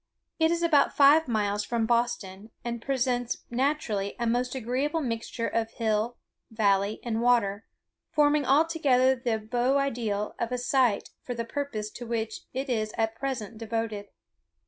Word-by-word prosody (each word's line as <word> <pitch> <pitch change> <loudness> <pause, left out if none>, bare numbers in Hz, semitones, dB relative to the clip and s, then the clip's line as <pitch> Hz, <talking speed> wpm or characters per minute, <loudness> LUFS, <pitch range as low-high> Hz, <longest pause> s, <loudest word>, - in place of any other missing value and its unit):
It 320 0 +4
is 340 0 0
about 300 -4 +3
five 290 +2 +6
miles 210 -3 0
from 235 -2 -1
Boston, 220 -4 -1 0.2
and 235 -1 -3
presents 245 -2 -1
naturally 240 -6 -1
a 235 - -2
most 245 +2 0
agreeable 265 +6 -1
mixture 230 -2 -3
of 225 -1 -1
hill, 225 +1 0 0.3
valley, 205 -2 +1
and 230 -1 -1
water, 225 -4 +2 0.4
forming 295 0 +3
altogether 275 -3 +3
the 240 -3 -1
beau 240 +5 +1
ideal 230 -7 -1
of 235 +1 -2
a 250 - 0
site 245 -3 +1
for 245 - -5
the 230 0 -3
purpose 230 -5 -4
to 240 - -8
which 225 -1 -3
it 265 +2 -3
is 215 -4 -1
at 225 0 +1
present 230 -4 -4
devoted. 225 -2 -3
235 Hz, 150 wpm, -27 LUFS, 220-265 Hz, 0.4 s, five